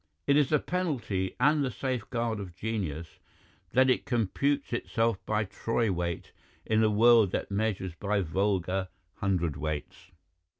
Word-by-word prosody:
It 140 - +4
is 145 -2 +4
the 150 - +4
penalty 130 - -2
and 150 -1 +4
the 135 - 0
safeguard 120 -3 -2
of 90 -4 -7
genius 85 -8 -4 0.5
that 130 +1 +5
it 130 - +2
computes 140 +5 0
itself 115 -3 0
by 105 0 +1
troy 115 +2 -1
weight 85 -2 -3 0.3
in 110 0 +2
a 110 - +4
world 110 0 +6
that - - -2
measures 100 -3 -1
by 100 +3 -1
vulgar 95 +1 0 0.3
hundredweights. 85 -2 -2
105 Hz, 135 wpm, -29 LUFS, 95-120 Hz, 0.5 s, world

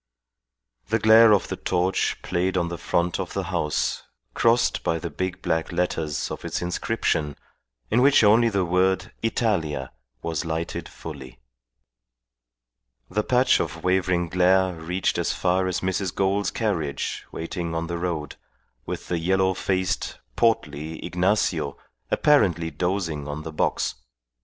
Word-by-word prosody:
The 110 - +2
glare 110 +1 +7
of 100 - +3
the - - -2
torch 90 +1 0
played 90 +2 0
on 85 -1 0
the 85 - -5
front 85 0 0
of - - -4
the - - -1
house 75 -1 0 0.3
crossed 115 +1 +2
by 80 - +1
the 85 -1 -5
big 90 +4 -4
black 80 -2 0
letters 85 -4 -1
of - - -6
its - - -2
inscription 90 -5 -1 0.6
in 120 - +4
which 140 -2 +6
only 115 +3 +5
the 100 -3 0
word 95 +3 +1
Italia 105 -9 -1 0.3
was 80 -2 -2
lighted 80 0 -4
fully. 65 -6 -9 1.7
The 105 +3 +1
patch 125 +3 +3
of - - -4
wavering 90 -1 +1
glare 90 +2 +3
reached 85 +3 -1
as - - 0
far 95 +1 +1
as 90 -1 -1
Mrs. 95 -1 -1
Gould's 100 0 +1
carriage 80 - -2
waiting 85 0 -4
on 80 0 -1
the 85 0 -4
road, 85 -5 -3 0.5
with - - -5
the 85 - -1
yellow 95 +2 +2
faced, 95 0 -1 0.2
portly 80 - 0
Ignacio 90 -5 0 0.3
apparently 90 - +3
dozing 85 -2 -2
on 75 +1 -5
the 80 -1 -7
box. - - 0
90 Hz, 140 wpm, -24 LUFS, 80-95 Hz, 1.7 s, glare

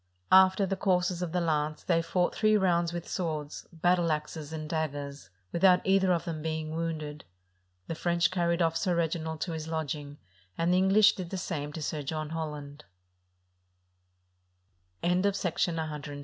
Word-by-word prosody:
After 190 +1 +6
the 195 +1 -1
courses 180 -2 +1
of 175 -2 -2
the 180 - 0
lance, 155 -2 -1
they 165 -2 +2
fought 175 +2 0
three 215 -1 +3
rounds 175 -3 +2
with 175 -1 -5
swords, 155 -5 -4
battle 175 0 +2
axes, 150 0 -4
and 155 -1 -5
daggers, 145 -3 -4 0.2
without 180 +1 +5
either 190 -1 +3
of 170 -1 0
them 165 -3 -4
being 155 0 -3
wounded. 155 -3 -4 0.6
The - - -4
French 170 +1 +1
carried 170 -1 +1
off 165 0 +1
Sir 175 +1 +1
Reginald 160 -1 -2
to 175 - -2
his 160 -1 -5
lodging, 150 -2 -4 0.4
and 170 +2 +2
the - - +4
English 195 +3 +5
did 180 -3 -6
the 190 - -4
same 145 -4 -4
to 160 - -5
Sir 150 +1 -2
John 155 +2 -4
Holland. 150 -3 -5
165 Hz, 150 wpm, -29 LUFS, 155-180 Hz, 0.6 s, After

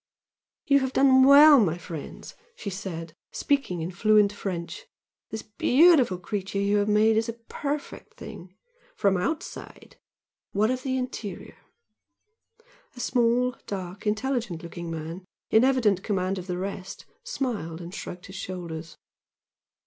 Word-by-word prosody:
"You 280 -1 +5
have 265 -1 -2
done 260 -1 +6
well, 285 +1 +9
my 175 -7 +1
friends!" 165 -4 -8 0.2
she 200 - -6
said, 170 -5 -6 0.2
speaking 270 - -1
in 170 - -4
fluent 210 +2 +3
French 195 - -5 0.4
"This 220 - -6
beautiful 255 - +4
creature 195 +1 -4
you 200 +1 +2
have 205 0 +1
made 215 +1 +4
seems 230 - -7
a - - -2 0.2
perfect 290 0 -5
thing, 180 +1 -10 0.4
from 200 - +2
the 180 - 0
OUTSIDE. 305 - -5 0.6
What 215 +4 +2
of 255 0 -2
the 260 0 -1
interior?" 250 -5 -6 1.4
A - - -11
small, 245 +1 +1
dark, 190 +1 -6
intelligent 215 -5 -1
looking 170 0 -7
man, 165 +3 -6 0.3
in 220 - +5
evident 235 -8 +3
command 190 -2 -1
of 180 - -9
the 180 -1 -3
rest, 190 0 -6 0.2
smiled 235 - -3
and 175 +1 -9
shrugged 180 -3 -7
his 190 - -11
shoulders. 170 -4 -7
205 Hz, 140 wpm, -26 LUFS, 180-250 Hz, 1.4 s, well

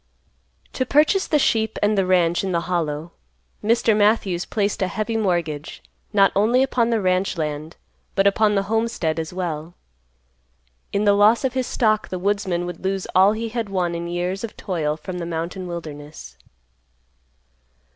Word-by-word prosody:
To - - 0
purchase 305 +9 +3
the 305 - +3
sheep 220 -6 +1
and 210 +1 +3
the 195 -2 +1
ranch 175 -1 +2
in 190 -2 -2
the 170 - +1
Hollow, 165 -2 -2 0.5
Mr. 225 0 +3
Matthews 205 -4 +2
placed 205 -2 -1
a 190 - +2
heavy 215 +4 -3
mortgage 170 -8 -2 0.3
not 195 -2 +4
only 230 +6 +3
upon 245 -3 +1
the 230 -2 +1
ranch 185 0 0
land 155 0 -4 0.4
but 195 - +3
upon 210 +1 +3
the 195 - +2
homestead 215 -7 -1
as 160 0 -4
well. 170 -2 -4 1.2
In 200 - 0
the 205 - +5
loss 210 +5 +4
of 260 -2 0
his 260 -1 -1
stock 215 -3 +1
the 185 - -3
woodsman 185 -2 -1
would 175 0 -7
lose 190 0 -1
all 190 +3 +5
he 225 +1 -3
had 225 -2 -3
won 180 -3 -1
in 170 0 -4
years 180 +3 -3
of 230 - -6
toil 155 -5 -2
from 180 +3 -6
the 170 - -4
mountain 170 +3 -4
wilderness. 150 - -8
190 Hz, 165 wpm, -22 LUFS, 170-215 Hz, 1.2 s, the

